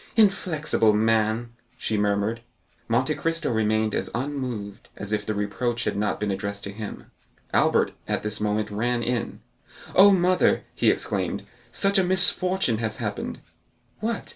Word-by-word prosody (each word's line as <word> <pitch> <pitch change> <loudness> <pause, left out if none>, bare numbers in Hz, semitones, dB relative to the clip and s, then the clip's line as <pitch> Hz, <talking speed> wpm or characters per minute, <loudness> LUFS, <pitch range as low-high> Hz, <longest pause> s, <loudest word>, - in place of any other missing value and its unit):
"Inflexible 175 - +3
man!" 110 +2 +1 0.3
she 110 - -2
murmured. 105 +2 0 0.5
Monte 125 +6 +1
Cristo 165 0 -1
remained 110 -1 +1
as - - -2
unmoved 125 -6 -4
as 100 +1 -5
if 105 -1 -1
the 110 - -1
reproach 120 +4 -1
had - - -1
not 105 0 -1
been 105 -1 -1
addressed 100 +1 -4
to 100 - -5
him. 105 +1 -8 0.4
Albert - - +3 0.2
at - - -1
this 105 0 -3
moment 105 0 0
ran 120 +3 0
in. 120 0 -2 0.5
"Oh, 195 +2 +8
mother," 185 -1 +3
he - - +2
exclaimed, - - -1 0.3
"such 200 0 +2
a - - +4
misfortune 180 - +2
has 110 -2 -2
happened!" - - -4 0.6
"What? 225 0 -3
115 Hz, 145 wpm, -25 LUFS, 105-155 Hz, 0.6 s, Oh